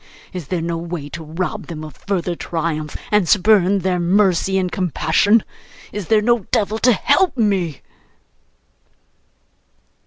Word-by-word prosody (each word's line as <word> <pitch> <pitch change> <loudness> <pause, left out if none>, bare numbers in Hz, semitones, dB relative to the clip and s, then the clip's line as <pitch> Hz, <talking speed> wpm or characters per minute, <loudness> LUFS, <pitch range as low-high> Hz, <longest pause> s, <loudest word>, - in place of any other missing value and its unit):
Is 180 -6 -6
there 170 0 -2
no 170 0 -2
way 170 -4 -6
to 165 +2 -7
rob 165 +4 -4
them 155 -2 -7
of 155 -4 -9
further 180 -1 -2
triumph, 160 -3 -3
and 210 -5 +2
spurn 200 -1 +4
their 185 -1 0
mercy 190 +1 +2
and 185 -2 -1
compassion? 190 +4 +2 0.5
Is 205 -5 -5
there 215 -1 +3
no 235 -3 +1
devil 215 +1 +1
to 250 +1 +4
help 285 - +2
me? 190 - 0
185 Hz, 135 wpm, -19 LUFS, 165-210 Hz, 0.5 s, spurn